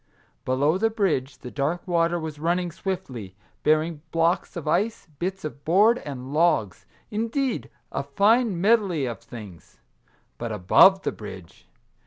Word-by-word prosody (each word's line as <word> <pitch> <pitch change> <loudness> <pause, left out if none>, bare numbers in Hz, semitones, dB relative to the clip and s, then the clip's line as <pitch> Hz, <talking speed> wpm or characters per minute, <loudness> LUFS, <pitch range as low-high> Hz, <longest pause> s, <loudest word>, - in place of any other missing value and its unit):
Below 145 +7 +2
the 225 +2 +3
bridge 155 - -1
the 125 -1 -9
dark 155 +7 -2
water 170 0 +2
was 155 -2 -6
running 175 +2 0
swiftly, 130 - -5 0.3
bearing 155 0 +1
blocks 165 +2 +1
of 170 -4 -6
ice, 215 +8 0
bits 190 0 -3
of 145 -2 -7
board, 210 +8 +4
and 135 -1 -7
logs, 150 - +1
— - - -38
indeed, 230 +4 -1 0.2
a - - -2
fine 200 - +2
medley 195 - +2
of 120 -2 -4
things. 105 -8 -12 0.6
But 115 -1 -4
above 150 - +5
the - - 0
bridge 95 -5 -11
165 Hz, 145 wpm, -25 LUFS, 135-190 Hz, 0.6 s, above